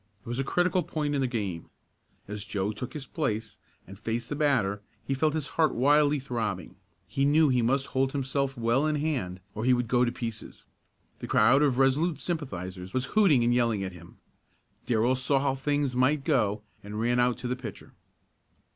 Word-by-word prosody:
It - - -19
was 120 +2 -2
a - - +1
critical 180 +5 +1
point 155 -3 -2
in 140 - 0
the 130 - +1
game. 100 -9 -4 0.6
As 105 0 -4
Joe 100 -1 -2
took 125 +4 -6
his 150 -3 -6
place 110 -8 -3 0.3
and 95 +2 -12
faced 115 +2 -3
the 145 - -2
batter 125 -10 +1 0.2
he 135 - -1
felt 155 +3 +1
his 150 -3 -2
heart 160 -2 +1
wildly 145 +3 +4
throbbing. 110 -9 -4 0.3
He 135 +9 -2
knew 150 +2 +4
he 125 -2 +2
must 135 +4 +1
hold 135 0 +1
himself 135 -1 -1
well 120 +5 +2
in 155 - +1
hand 130 - -2
or 110 - -4
he 130 +1 +4
would 120 -1 -1
go 125 +2 +3
to 120 - +1
pieces. 115 -3 -7 0.5
The - - -6
crowd 125 +6 +5
of 140 -4 +2
Resolute 140 +5 +2
sympathizers 95 - -5
was 130 0 +1
hooting 180 - +5
and 120 +1 +3
yelling 115 -5 +1
at 95 - -4
him. 85 0 -14 0.7
Darrell 120 +2 +2
saw 130 +2 +1
how 135 -1 +1
things 140 -1 -1
might 135 +3 +2
go 110 -9 +1 0.2
and 105 +1 -6
ran 120 +2 +1
out 125 0 +2
to 125 - -5
the 125 - -1
pitcher. 120 -6 -9
125 Hz, 195 wpm, -28 LUFS, 110-145 Hz, 0.7 s, crowd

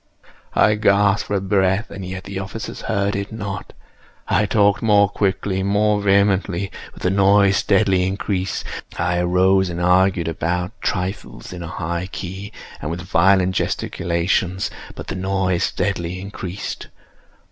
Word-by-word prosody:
I 105 - +5
gasped 100 -1 +3
for 100 -1 0
breath—and 95 +1 0
yet 95 0 -6
the 95 +1 -5
officers 95 +3 -6
heard 100 -2 0
it 100 0 -3
not. 100 -3 -5 0.6
I 105 - +2
talked 100 -1 +3
more 105 -2 +5
quickly—more 100 +1 +1
vehemently; 100 -1 +2 0.2
but - - -13
the 90 - +2
noise 100 0 +4
steadily 95 -2 +2
increased. 95 -1 -2 0.3
I 90 +1 0
arose 95 +2 +3
and 85 0 -4
argued 90 -1 +3
about 90 +2 -1
trifles, 90 +1 -3
in 90 - -7
a 85 - -5
high 85 +2 -3
key 95 +3 -6 0.3
and 75 - -3
with 85 +2 -4
violent 95 +1 +3
gesticulations; 90 +2 -1 0.2
but - - -7
the - - -4
noise 95 -1 0
steadily 90 -2 -2
increased. 95 -1 -6
95 Hz, 135 wpm, -21 LUFS, 90-100 Hz, 0.6 s, I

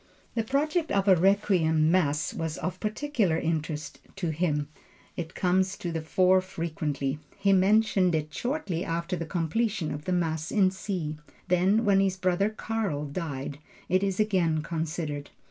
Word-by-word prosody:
The 230 - +1
project 300 +7 0
of 195 0 +1
a 190 - +8
Requiem 175 -4 +3
Mass 155 -4 +1
was 160 -1 -3
of 185 0 -4
particular 215 - 0
interest 160 -2 -3 0.2
to 175 -5 -2
him; 150 -3 0 0.5
it 165 -1 -5
comes 185 +2 +1
to 175 - -4
the 165 -1 -2
fore 185 +3 +3
frequently. 155 -6 -3 0.2
He 195 0 +3
mentioned 190 -2 +4
it 155 -1 -3
shortly 245 - -2
after 170 +1 -2
the 165 -2 -4
completion 180 +3 -1
of 145 +1 -6
the 185 - -1
Mass 160 -2 0
in 195 -3 +4
C. 180 -5 -4 0.3
Then, 190 +6 +3
when 200 -1 +4
his 190 -1 +1
brother 185 +2 +1
Karl 215 -9 -2
died 145 -2 -5 0.3
it 185 +1 +3
is 195 -1 -1
again 175 -7 +2
considered. 155 -2 -3
180 Hz, 155 wpm, -28 LUFS, 160-195 Hz, 0.5 s, a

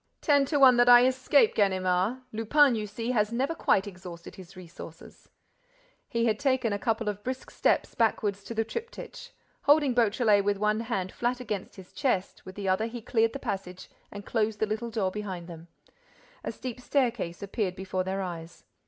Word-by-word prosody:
"Ten 285 -2 +3
to 290 +2 0
one 260 -3 +7
that 245 0 +5
I 245 0 +9
escape, 260 - +3
Ganimard! 190 +3 +1
Lupin, 255 +5 +4
you 215 -2 -3
see, 230 +4 -4
has 210 -3 +1
never 265 +7 0
quite 195 -10 +2
exhausted 180 -3 -10
his 190 -1 -13
resources—" 170 -2 -12 0.8
He 230 0 0
had 215 -2 +1
taken 260 -5 +1
a 205 - -2
couple 225 0 -1
of 205 0 -3
brisk 255 +1 -5
steps - - +1
backward 220 -3 +1
to 200 +4 -10
the 225 - +1
triptych. 465 - -8 0.4
Holding 290 -2 +4
Beautrelet 220 -3 +3
with 200 0 0
one 210 +1 +1
hand 195 -6 -3
flat 245 +1 -2
against 215 -6 -5
his 190 -2 -14
chest, 245 -11 -2
with 185 - -9
the 200 -2 -5
other 190 +4 +1
he 230 0 -8
cleared 225 -1 +1
the - - -3
passage 195 -7 -6 0.2
and 205 0 -9
closed 220 -2 -1
the - - +2
little 220 +2 -3
door 210 -5 -1
behind 185 -4 -6
them. 165 -1 -10 0.8
A - - -3
steep 250 -1 -7
staircase 235 -11 -1
appeared 200 -2 -2
before 185 0 -3
their 190 +1 -3
eyes. 170 -2 -8
215 Hz, 185 wpm, -28 LUFS, 190-245 Hz, 0.8 s, I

